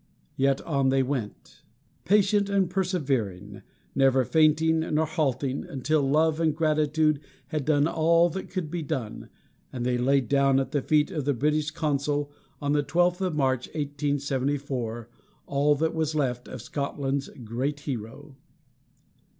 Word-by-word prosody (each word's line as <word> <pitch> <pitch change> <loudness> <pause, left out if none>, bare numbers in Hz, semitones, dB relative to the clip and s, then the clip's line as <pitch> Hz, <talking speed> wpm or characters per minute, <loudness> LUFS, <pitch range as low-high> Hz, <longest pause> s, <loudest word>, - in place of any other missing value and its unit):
Yet 135 0 +1
on 140 -4 +1
they 135 0 +3
went, 125 -6 -5 0.4
patient 200 +2 +3
and 195 -3 +1
persevering, 130 - -2 0.3
never 135 -1 +3
fainting 160 +2 +3
nor 160 0 0
halting, 140 -4 -1
until 145 +3 0
love 155 +3 +2
and 160 -2 +1
gratitude 155 -1 +2 0.3
had 155 -4 -2
done 145 -1 +3
all 165 +1 +3
that 190 +3 -6
could 180 -5 -4
be 175 -1 -2
done, 135 -8 -5 0.4
and 120 -2 -4
they 125 0 +1
laid 135 0 +2
down 135 +1 +3
at 135 - -3
the 145 - 0
feet 150 +2 +2
of 150 -5 -3
the 145 -2 +1
British 150 +4 +1
consul, 145 -2 -1 0.3
on 145 -1 -1
the 150 0 +3
twelfth 175 +5 +1
of 185 -4 -1
March, 130 -3 0
1874, 140 -5 -2 0.4
all 145 +1 +2
that 160 +3 0
was 160 -1 -1
left 125 -4 -1
of 125 -4 -8
Scotland's 140 0 -3 0.2
great 135 +6 -2
hero. 135 +2 -6
145 Hz, 145 wpm, -26 LUFS, 135-155 Hz, 0.4 s, they